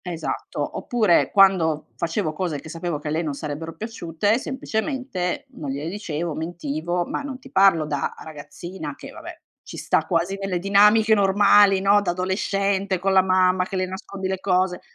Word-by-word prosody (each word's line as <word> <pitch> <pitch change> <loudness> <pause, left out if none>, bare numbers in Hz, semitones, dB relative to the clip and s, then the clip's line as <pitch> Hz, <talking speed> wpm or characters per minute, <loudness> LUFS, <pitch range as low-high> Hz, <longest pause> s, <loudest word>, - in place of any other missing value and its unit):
Esatto. 175 -3 -4
Oppure 215 -8 +2
quando 180 -6 +3
facevo 165 -1 -2
cose 160 -2 -3
che 155 +3 -10
sapevo 170 -2 -3
che 150 - -6
a - - -2
lei 160 +3 0
non 150 -3 -3
sarebbero 150 +2 -6
piaciute, 210 0 -1
semplicemente 255 - -3
non 145 - -8
gliele 140 +4 -3
dicevo, 170 -4 -4
mentivo; 170 +1 -3
ma - - -4
non 275 -3 -6
ti 270 0 -15
parlo 190 -6 +4
da 145 -2 -3
ragazzina 155 +1 -8
che, - - -11
vabbè, - - -10 0.2
ci - - -10
sta - - 0
quasi 175 +4 0
nelle 195 -2 -2
dinamiche 210 +3 +4
normali, 200 -1 +5
no, 200 +1 +5
da 185 -4 -1
adolescente 195 +1 -1
con 195 +2 0
la 190 - +6
mamma 185 0 +2
che 195 -1 -5
le 185 - 0
nascondi 190 +1 -6
le 190 0 -2
cose. 185 -1 +1
185 Hz, 175 wpm, -23 LUFS, 165-200 Hz, 0.2 s, la